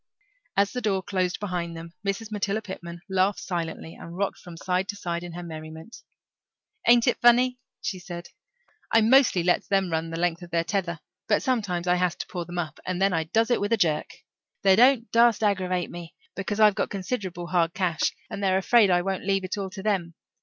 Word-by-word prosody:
As 200 Hz, 0 st, +3 dB
the 250 Hz, -, -3 dB
door 195 Hz, -4 st, 0 dB
closed 185 Hz, -2 st, -1 dB
behind 175 Hz, -4 st, -3 dB
them 165 Hz, +1 st, -9 dB
Mrs. 205 Hz, +2 st, -3 dB
Matilda 210 Hz, +1 st, -1 dB
Pitman 170 Hz, -3 st, -8 dB
laughed 190 Hz, +1 st, +1 dB
silently, 165 Hz, -2 st, -4 dB
and 170 Hz, +1 st, -10 dB
rocked 200 Hz, 0 st, -1 dB
from 175 Hz, -2 st, -11 dB
side 185 Hz, +2 st, -1 dB
to 205 Hz, -, -4 dB
side 175 Hz, -4 st, -3 dB
in 175 Hz, -1 st, -7 dB
her 175 Hz, +1 st, -6 dB
merriment. 160 Hz, +4 st, -9 dB, 0.9 s
"Ain't 235 Hz, 0 st, +6 dB
it -, -, +1 dB
funny?" 250 Hz, +1 st, +5 dB, 0.2 s
she 190 Hz, -, -3 dB
said. 175 Hz, -1 st, -8 dB, 0.6 s
"I 225 Hz, -, +5 dB
mostly 235 Hz, -5 st, +5 dB
lets 175 Hz, 0 st, +1 dB
them 195 Hz, -3 st, +1 dB
run 160 Hz, 0 st, -1 dB
the 165 Hz, -, -4 dB
length 175 Hz, 0 st, 0 dB
of 175 Hz, -, -10 dB
their 170 Hz, -1 st, +1 dB
tether, 175 Hz, -3 st, -2 dB, 0.3 s
but 210 Hz, -, +2 dB
sometimes 200 Hz, -9 st, -1 dB
I 180 Hz, 0 st, +3 dB
has 180 Hz, -1 st, +1 dB
to -, -, -5 dB
pull 175 Hz, -1 st, -5 dB
them 175 Hz, +1 st, -7 dB
up, 165 Hz, -3 st, -3 dB
and 180 Hz, -1 st, -3 dB
then 195 Hz, 0 st, +3 dB
I 160 Hz, -1 st, 0 dB
does 225 Hz, +8 st, +1 dB
it 240 Hz, -, +2 dB
with 205 Hz, +3 st, 0 dB
a -, -, +3 dB
jerk. 160 Hz, -6 st, +1 dB, 0.6 s
They 195 Hz, -1 st, +6 dB
don't 245 Hz, 0 st, +4 dB
dast 230 Hz, -1 st, +4 dB
aggravate 185 Hz, -3 st, 0 dB
me, 170 Hz, -1 st, -9 dB, 0.2 s
because 205 Hz, +2 st, -3 dB
I've 210 Hz, -1 st, +7 dB
got 205 Hz, -, -1 dB
considerable 185 Hz, -3 st, -4 dB
hard 170 Hz, -2 st, +1 dB
cash, 175 Hz, -6 st, +1 dB, 0.2 s
and 200 Hz, -, -6 dB
they're 190 Hz, -1 st, +3 dB
afraid 210 Hz, +2 st, +4 dB
I 175 Hz, -1 st, +3 dB
won't 190 Hz, 0 st, -3 dB
leave 195 Hz, -1 st, +1 dB
it 185 Hz, -, -3 dB
all 195 Hz, -2 st, -4 dB
to 190 Hz, 0 st, -9 dB
them. 185 Hz, -6 st, -1 dB
185 Hz, 210 wpm, -26 LUFS, 175-205 Hz, 0.9 s, I've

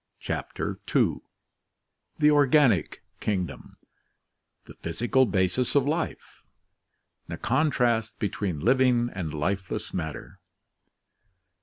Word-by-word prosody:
CHAPTER -, -, -4 dB
H -, -, +1 dB, 1.2 s
The 150 Hz, -1 st, +5 dB
Organic 140 Hz, -, +3 dB, 0.2 s
Kingdom 95 Hz, -5 st, -3 dB, 1.0 s
Physical 120 Hz, +10 st, +1 dB
Basis 95 Hz, +7 st, +1 dB
of 140 Hz, -1 st, +3 dB
Life 160 Hz, +2 st, -3 dB, 1.0 s
Contrast 120 Hz, -7 st, +1 dB
between 100 Hz, -5 st, -2 dB
Living 125 Hz, -, +3 dB
and 85 Hz, -5 st, -4 dB
Lifeless 95 Hz, +6 st, -3 dB
Matter. 80 Hz, -4 st, -5 dB
115 Hz, 75 wpm, -26 LUFS, 90-130 Hz, 1.2 s, The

